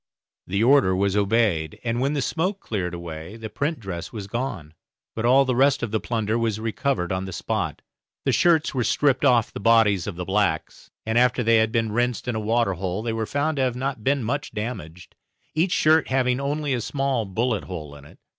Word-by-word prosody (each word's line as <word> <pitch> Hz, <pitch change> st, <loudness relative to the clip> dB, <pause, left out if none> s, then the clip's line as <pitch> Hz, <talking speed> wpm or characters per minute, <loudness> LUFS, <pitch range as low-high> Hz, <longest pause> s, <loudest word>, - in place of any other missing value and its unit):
The 100 Hz, +4 st, 0 dB
order 125 Hz, -7 st, +5 dB
was 100 Hz, +1 st, +1 dB
obeyed 100 Hz, -6 st, +1 dB
and 120 Hz, 0 st, -1 dB
when 140 Hz, +2 st, +1 dB
the 140 Hz, -3 st, 0 dB
smoke 185 Hz, +8 st, -1 dB
cleared 90 Hz, -, -3 dB
away 85 Hz, +3 st, -8 dB
the 110 Hz, -1 st, -7 dB
print 145 Hz, +7 st, -2 dB
dress 90 Hz, -6 st, -6 dB
was 105 Hz, -4 st, -6 dB
gone, 95 Hz, -, -4 dB, 0.4 s
but 115 Hz, -, -3 dB
all 135 Hz, +3 st, +5 dB
the 130 Hz, -1 st, 0 dB
rest 135 Hz, +1 st, +3 dB
of 115 Hz, -, -2 dB
the 110 Hz, -, +1 dB
plunder 110 Hz, -1 st, -1 dB
was 110 Hz, -2 st, -1 dB
recovered 115 Hz, -3 st, -1 dB
on 95 Hz, 0 st, -2 dB
the 95 Hz, -, -6 dB
spot. -, -, -3 dB, 0.4 s
The -, -, +3 dB
shirts 165 Hz, -3 st, +3 dB
were 130 Hz, -3 st, 0 dB
stripped 135 Hz, +2 st, +2 dB
off 125 Hz, -5 st, +3 dB
the -, -, -5 dB
bodies 105 Hz, -3 st, +3 dB
of 100 Hz, -, -4 dB
the 90 Hz, +1 st, -5 dB
blacks; 95 Hz, -4 st, -1 dB, 0.2 s
and 110 Hz, +2 st, +2 dB
after 125 Hz, 0 st, +3 dB
they 115 Hz, 0 st, +4 dB
had 110 Hz, 0 st, +2 dB
been 115 Hz, -1 st, 0 dB
rinsed 120 Hz, +2 st, -1 dB
in 125 Hz, -, 0 dB
a 110 Hz, -, -2 dB
water 110 Hz, -1 st, +1 dB
hole, 95 Hz, +3 st, -3 dB
they 115 Hz, -1 st, -2 dB
were 110 Hz, -1 st, -2 dB
found 145 Hz, +2 st, -1 dB
to -, -, +1 dB
have 130 Hz, -2 st, +1 dB, 0.3 s
been 140 Hz, +3 st, +2 dB
not -, -, -4 dB
much 140 Hz, +6 st, -3 dB
damaged, 90 Hz, -6 st, -6 dB, 0.4 s
each 170 Hz, +4 st, +1 dB
shirt 160 Hz, 0 st, +4 dB
having 130 Hz, -1 st, +1 dB
only 145 Hz, 0 st, -1 dB
a 120 Hz, -, -1 dB
small 135 Hz, -3 st, -1 dB
bullet 115 Hz, +6 st, -1 dB
hole 75 Hz, -6 st, -7 dB
in 70 Hz, -1 st, -13 dB
it. 75 Hz, -, -16 dB
115 Hz, 215 wpm, -24 LUFS, 100-130 Hz, 0.4 s, order